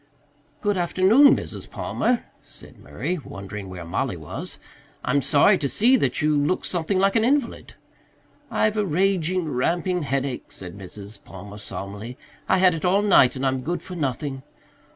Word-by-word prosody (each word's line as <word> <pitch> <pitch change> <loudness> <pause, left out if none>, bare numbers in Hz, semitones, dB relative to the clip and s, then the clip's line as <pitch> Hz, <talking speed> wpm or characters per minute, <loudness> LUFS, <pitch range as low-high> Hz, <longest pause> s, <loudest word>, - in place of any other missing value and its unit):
"Good 205 -1 0
afternoon, 190 +10 +5
Mrs. - - -6
Palmer," 245 -1 -1 0.2
said - - -15
Murray, 180 -1 -4
wondering 100 -1 -8
where 90 -2 -8
Mollie 85 - -2
was. - - -6 0.5
"I'm 140 +3 +2
sorry 160 +8 +4
to 140 - -1
see 240 - +4
that 205 - 0
you 150 0 +3
look 145 +5 0
something 175 +2 0
like 195 +1 +2
an 225 - +3
invalid." 265 0 0 0.7
"I've 215 0 +1
a 210 - +2
raging, 185 -1 0
ramping 175 +7 0
headache," 135 -2 -3
said 90 -1 -8
Mrs. 100 +1 -10
Palmer 100 +2 -10
solemnly. 105 +4 -7 0.3
"I - - +4
had 185 -1 +5
it 165 - -5
all 190 +3 +3
night 140 -12 +5
and 135 +1 -3
I'm 130 -1 0
good 175 +6 -3
for 185 - -9
nothing. 135 -3 -3
160 Hz, 160 wpm, -23 LUFS, 125-190 Hz, 0.7 s, afternoon